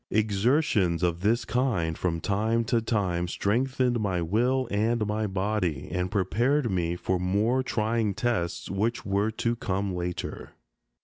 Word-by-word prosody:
Exertions 105 - +2
of 85 -1 +1
this 115 +3 +2
kind, 105 -10 0
from 85 -1 -1
time 110 +6 +1
to 115 +1 +1
time, 95 -6 0
strengthened 125 +5 0
my 95 -4 0
will 120 +9 +1
and 110 +2 +1
my 105 +1 -1
body, 95 -6 -1
and 90 0 -1
prepared 120 +7 +1
me 85 -2 0
for 90 +1 -1
more 105 +8 +1
trying 110 -4 0
tests 90 -8 -1
which 110 +5 -1
were 100 +2 +1
to 115 +2 -1
come 100 -3 -2
later. 90 0 -5
105 Hz, 140 wpm, -27 LUFS, 90-115 Hz, -, Exertions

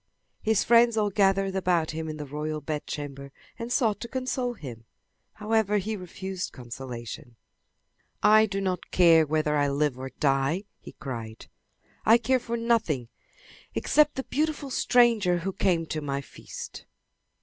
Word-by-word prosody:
His 220 -1 +2
friends 235 0 +5
all 210 -1 +1
gathered 195 -1 +2
about 175 -4 +1
him 160 0 -4
in 155 - -5
the 150 - -5
royal 150 +2 -4
bedchamber 145 -2 -5 0.3
and 235 +1 -5
sought 225 -5 +2
to 235 - -6
console 255 0 -2
him. 120 - -9 0.5
However 215 -1 +1
he 215 +2 -2
refused 190 0 -6
consolation. 120 -1 -8 0.9
"I 215 +1 +6
do 195 -1 -3
not 185 -2 -2
care 165 -3 +5
whether 155 0 +1
I 145 -1 +2
live 140 -2 0
or 130 0 -5
die!" 135 +7 0 0.2
he - - -12
cried. 115 -5 -7 0.6
"I 225 +2 +7
care 255 +2 +1
for 235 -1 -3
nothing 220 - 0 0.7
except 300 -1 +3
the 265 - -3
beautiful 295 -1 -2
stranger 230 -9 +3
who 190 +3 -3
came 175 -4 +1
to 155 -1 -4
my 140 -1 -2
feast." - - -10
180 Hz, 150 wpm, -27 LUFS, 145-220 Hz, 0.9 s, I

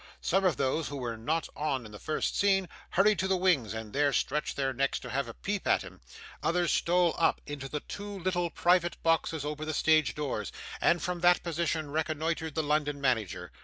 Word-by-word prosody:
Some 195 +2 +2
of 180 - +3
those 140 +3 0
who 145 - -5
were 120 -3 -3
not 155 +9 -1
on 140 -5 -1
in 105 - -10
the 105 - -10
first 155 - -1
scene, 195 -2 +3 0.2
hurried 205 +2 +3
to 190 - +1
the 190 -1 +2
wings, 175 - +2
and 110 -1 -6
there 145 0 +3
stretched 150 +3 -1
their 135 -1 0
necks 135 +2 0
to - - -7
have 140 +2 -1
a - - -8
peep 205 -1 -3
at - - +3
him; - - -12 0.4
others 175 -1 +1
stole 175 -1 +3
up 165 - +3
into 140 -2 -6
the 150 +1 -3
two 205 0 -7
little 175 -1 0
private 175 +1 +2
boxes 165 -2 +1
over 150 +1 -4
the 155 -1 -2
stage 155 -1 +3
doors, 150 -3 -3 0.3
and 175 - +3
from 180 0 -2
that 175 +1 +4
position 165 -3 -1
reconnoitred 160 0 -1
the 160 - +1
London 145 -1 0
manager. 110 -10 -1
155 Hz, 205 wpm, -30 LUFS, 140-175 Hz, 0.4 s, that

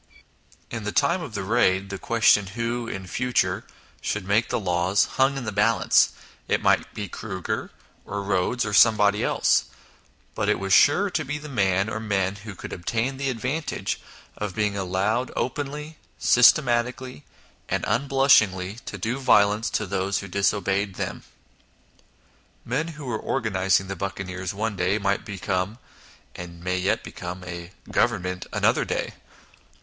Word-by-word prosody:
In 115 -2 -4
the 105 - -2
time 170 - +2
of 125 -9 -7
the 100 - -2
Raid 100 -2 +2
the 100 - -5
question 105 -3 +3
who, 115 0 -2
in 95 -4 -5
future, 125 +6 0 0.3
should 105 -2 -2
make 110 +3 +2
the - - 0
laws, 90 0 +2
hung 135 +1 +1
in 135 - -4
the 110 - -2
balance 105 +3 +4 0.4
it - - +2
might - - +2
be 105 - -4
Kruger, 95 -1 -4 0.3
or 100 0 -4
Rhodes, 100 +5 0
or 105 - -3
somebody 105 -1 +5
else; - - +2 0.7
but - - -1
it - - +3
was 95 +1 -1
sure - - +5
to - - -1
be 150 +3 -3
the 150 0 -9
man, 100 -7 +1
or 110 0 -3
men, 100 -3 -1
who 105 0 -9
could - - -8
obtain 115 +9 -2
the 135 0 -1
advantage 130 +6 -3 0.3
of 105 -3 -4
being 105 -2 0
allowed 100 +6 0
openly, 150 +4 -4 0.2
systematically, 125 - +3 0.5
and - - -1
unblushingly, 115 -6 +3
to - - -5
do 120 +4 -2
violence 105 -4 +3
to - - -1
those 100 0 -1
who 100 - -5
disobeyed 100 0 0
them. - - -4 1.4
Men 135 +7 -1
who 150 - -8
were 120 -4 -2
organising 95 -6 +1
the 95 - -4
buccaneers 95 0 -4
one 105 +1 -2
day, 95 +2 +1
might 100 -1 0
become 95 0 -2 0.6
(and 85 -1 -9
may 90 0 0
yet 90 - 0
become) 90 +1 -7
a 85 0 -7
" - - -14
Govern - - +2
ment 90 0 -4
" - - -29
another - - +2
day. - - -3
105 Hz, 160 wpm, -25 LUFS, 95-120 Hz, 1.4 s, somebody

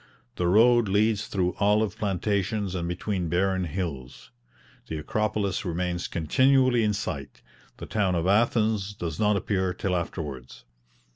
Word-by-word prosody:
The 90 - 0
road 115 +4 +5
leads 105 +2 +1
through 90 -2 0
olive 105 +1 +2
plantations 100 0 -1
and 85 -2 -3
between 90 0 -2
barren 95 +1 +1
hills. 65 -8 -6 0.6
The 80 - -4
Acropolis 100 +4 -1
remains 90 0 -2
continually 130 - +3
in 105 -1 +1
sight; 80 -9 -5 0.3
the - - -7
town 100 -4 0
of 85 0 0
Athens 105 0 +1
does 85 -5 -5
not 105 -1 +3
appear 95 -1 -1
till 90 0 -1
afterwards. 75 -7 -5
95 Hz, 135 wpm, -26 LUFS, 85-105 Hz, 0.6 s, road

